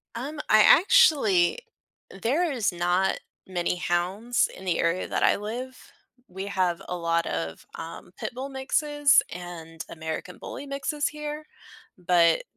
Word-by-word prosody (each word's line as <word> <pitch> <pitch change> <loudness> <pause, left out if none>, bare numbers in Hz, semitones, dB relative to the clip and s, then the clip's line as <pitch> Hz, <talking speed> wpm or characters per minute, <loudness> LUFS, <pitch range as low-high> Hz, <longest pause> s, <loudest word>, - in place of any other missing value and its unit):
Um, 285 +6 -5
I 215 - +7
actually 305 - +5 0.6
there 315 +8 +1
is 235 -8 0
not 175 +2 +1 0.3
many 180 -1 -1
hounds 185 +8 0
in 190 - -11
the 175 -3 0
area 170 +2 0
that - - -1
I - - +4
live. 245 +5 -5 0.5
We 190 +2 -6
have 185 -4 0
a 180 - -2
lot 170 0 0
of, 80 0 -4
um, 165 +2 -9
pit - - -4
bull 260 +3 -5
mixes 290 +1 +3
and 165 -2 -8
American 160 +2 -6
bully 285 - -8
mixes 280 +2 -2
here, 300 0 -6 0.5
but 170 -2 +3
190 Hz, 140 wpm, -26 LUFS, 175-275 Hz, 0.6 s, I